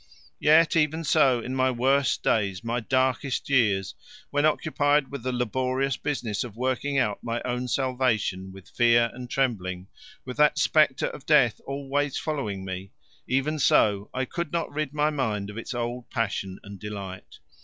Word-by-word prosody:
Yet 160 +2 +5
even 160 +1 +1
so, 130 -4 +3
in 125 - -5
my 130 0 +2
worst 130 +2 +1
days, 100 -3 0
my 120 +1 -1
darkest 130 +2 0
years, 105 -8 +2 0.4
when 145 +2 +3
occupied 150 -2 +1
with 140 -3 -5
the 130 +2 -2
laborious 130 +2 -1
business 120 -8 -2
of 120 -4 -9
working 130 +3 -1
out 105 -6 0
my 115 0 -2
own 125 0 -2
salvation 125 -8 0
with 95 -1 -13
fear 120 0 +3
and 125 0 -8
trembling, 95 -9 -2 0.4
with 125 -1 -7
that 150 0 +4
spectre 145 -1 +3
of 135 - -11
death 135 -7 +4
always 140 +1 -2
following 105 -11 -3
me, 95 +1 -6 0.3
even 135 +4 0
so 105 -6 +3
I 130 0 -2
could 170 +5 -4
not 170 -1 -2
rid 155 -2 -2
my 150 +1 +1
mind 105 -8 -2
of 105 - -11
its - - -7
old 120 0 -4
passion 95 -4 -2
and 100 -1 -10
delight. 100 -3 -8
125 Hz, 165 wpm, -26 LUFS, 105-140 Hz, 0.4 s, Yet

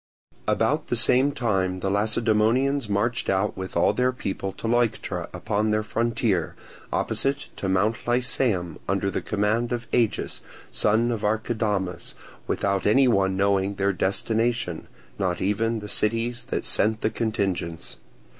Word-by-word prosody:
About - - +1
the - - 0
same 130 +3 +4
time 95 -9 -1
the 95 - 0
Lacedaemonians 110 +5 +2
marched 110 +4 0
out 95 +2 +1
with 95 0 -5
all - - +4
their 125 +3 +2
people 100 -5 -4
to - - -5
Leuctra 120 -1 0
upon 105 +1 -1
their 110 0 +1
frontier, 115 -5 0 0.4
opposite 140 +1 0
to 95 - -2
Mount 100 +5 +2
Lycaeum, 120 - +1
under 95 0 0
the - - -2
command 110 +3 0
of 120 -1 -2
Agis, 115 -3 +1 0.3
son 115 +3 +2
of 115 -3 -3
Archidamus, 105 -3 -1 0.3
without 100 -1 0
any 130 +6 +5
one 95 -5 +2
knowing 100 0 +1
their 100 0 +1
destination, 110 0 0 0.3
not 90 -2 0
even 110 +3 0
the 105 - -7
cities 115 +3 0
that - - -3
sent 110 +1 +2
the 110 - +1
contingents. 95 -7 -2
105 Hz, 140 wpm, -25 LUFS, 95-120 Hz, 0.4 s, any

